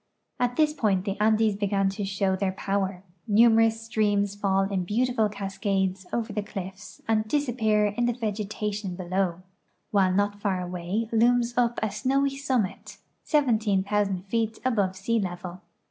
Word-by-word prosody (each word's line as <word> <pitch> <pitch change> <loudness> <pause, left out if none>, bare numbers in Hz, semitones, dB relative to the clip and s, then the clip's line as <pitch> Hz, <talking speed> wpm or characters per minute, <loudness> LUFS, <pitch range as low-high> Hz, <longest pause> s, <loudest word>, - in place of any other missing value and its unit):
At 245 0 0
this 305 +1 +3
point 205 -9 +1
the 195 -2 -1
Andes 215 0 +3
begin 195 -1 +1
to 195 +1 -4
show 195 -1 0
their 190 0 -1
power; 195 -1 -2 0.2
numerous 225 +1 +4
streams 205 -3 +1
fall 195 -1 +1
in 195 -2 -1
beautiful 225 +2 +1
cascades 195 -2 -2
over 230 -2 -2
the 210 - -1
cliff's 195 -1 -8
and 220 -1 +1
disappear 225 -6 +1
in 215 +4 0
the 240 - +1
vegetation 210 -3 -3
below, 185 -1 -2 0.5
while 195 -3 +3
not 205 +2 0
far 195 -3 0
away 180 +5 -3
looms 240 +1 +3
up 240 -1 +1
a 215 - 0
snowy 275 +5 0
summit, 260 -8 -2 0.3
17,000 210 - +1
feet 225 +2 -1
above 200 -7 +1
sea 225 +4 0
level. 180 -1 -5
205 Hz, 145 wpm, -26 LUFS, 195-225 Hz, 0.5 s, numerous